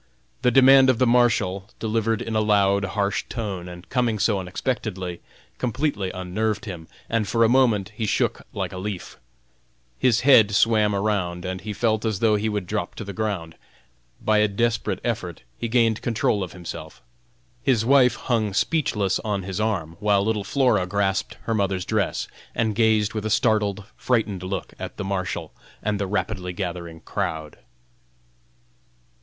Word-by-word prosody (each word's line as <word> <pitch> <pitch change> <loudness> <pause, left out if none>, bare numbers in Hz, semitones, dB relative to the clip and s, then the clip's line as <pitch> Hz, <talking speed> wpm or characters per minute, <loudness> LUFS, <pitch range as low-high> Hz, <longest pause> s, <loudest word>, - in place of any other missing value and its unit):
The 125 - +4
demand 135 +1 +7
of 130 - +3
the 130 - +3
Marshal, 115 -5 +2
delivered 115 0 0
in 115 - -4
a 110 - +3
loud, 100 -2 +3
harsh 100 +1 -1
tone, 100 -6 -4
and 90 0 -11
coming 120 -4 +1
so 105 -1 +2
unexpectedly, 95 -2 -3 0.4
completely 125 -5 -1
unnerved 105 +5 -2
him, 85 -6 -7 0.2
and 115 -2 0
for 115 +2 +2
a - - +6
moment 115 -6 +3
he 110 0 -3
shook - - 0
like - - -4
a 90 - -5
leaf. 95 -6 -6 0.8
His 120 -3 +3
head 110 -7 +6
swam 105 -2 +3
around, 95 -4 -1
and 95 0 -4
he 105 - -5
felt 110 +1 0
as 110 -3 0
though 110 +1 +3
he 105 +1 0
would 105 -3 -2
drop - - -3
to - - -6
the 100 - -7
ground. 100 -7 -3 0.7
By 110 -1 +2
a 105 - +4
desperate 115 +3 0
effort 100 - -3 0.2
he 115 - -2
gained 115 -2 +2
control 110 -3 0
of 90 -3 -5
himself. 85 -6 -8 0.6
His 120 -5 +2
wife 130 -1 +5
hung 110 -5 -1
speechless 105 - +1
on 100 -3 -2
his 95 +2 -3
arm, 85 -7 -2
while 100 -1 +2
little 110 -2 0
Flora 110 -4 +2
grasped 100 0 -1
her 115 - -1
mother's 95 -3 0
dress, - - -1 0.3
and 110 -2 +1
gazed 110 -1 +2
with 110 -2 -3
a 110 - -2
startled, 105 -2 +1
frightened 110 -7 0
look 95 +1 -4
at - - -7
the - - -3
Marshal 95 -4 -3 0.3
and 105 -1 0
the 100 - -1
rapidly 95 -2 -2
gathering 85 -3 -5
crowd. 80 -1 -4
105 Hz, 165 wpm, -24 LUFS, 95-115 Hz, 0.8 s, demand